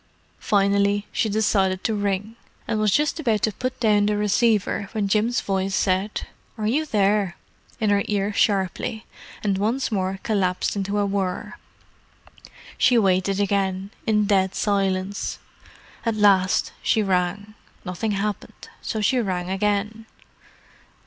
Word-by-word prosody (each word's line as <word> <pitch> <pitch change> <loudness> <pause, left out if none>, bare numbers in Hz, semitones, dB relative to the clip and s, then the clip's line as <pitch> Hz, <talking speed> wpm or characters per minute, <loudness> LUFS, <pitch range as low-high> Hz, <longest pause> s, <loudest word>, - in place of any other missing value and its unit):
Finally, 200 0 +2
she 220 - 0
decided 195 -3 +1
to 225 - 0
ring: 205 +1 -2 0.3
and 220 -2 -1
was 215 0 +2
just 300 +8 +1
about 225 -9 0
to 215 - +2
put 255 +5 -4
down 210 -3 +3
the 210 0 +1
receiver 210 -1 +1
when 210 -2 0
Jim's 220 +4 +1
voice 195 0 -1
said, 190 +2 0 0.3
"Are 215 - -3
you 295 +8 +1
there?" 200 -5 +1 0.4
in 215 -3 +1
her 200 0 +3
ear 205 0 -1
sharply, 200 +2 0 0.4
and 200 -2 0
once 230 +6 0
more 190 -2 -1
collapsed 190 -4 0
into 200 +1 -2
a 205 - +2
whir. 195 -2 -2 1.3
She 250 - +5
waited 195 -1 +2
again, 195 -1 0 0.2
in 210 -1 +3
dead 190 -2 +2
silence. 195 -1 -1 0.7
At 230 -2 0
last 195 -3 +3
she 220 - +2
rang. 195 +2 -1 0.3
Nothing 195 +4 -2
happened, 205 +1 -4
so 220 - -3
she 250 +5 +2
rang 185 -4 -2
again. 210 +3 -1
205 Hz, 135 wpm, -23 LUFS, 195-215 Hz, 1.3 s, She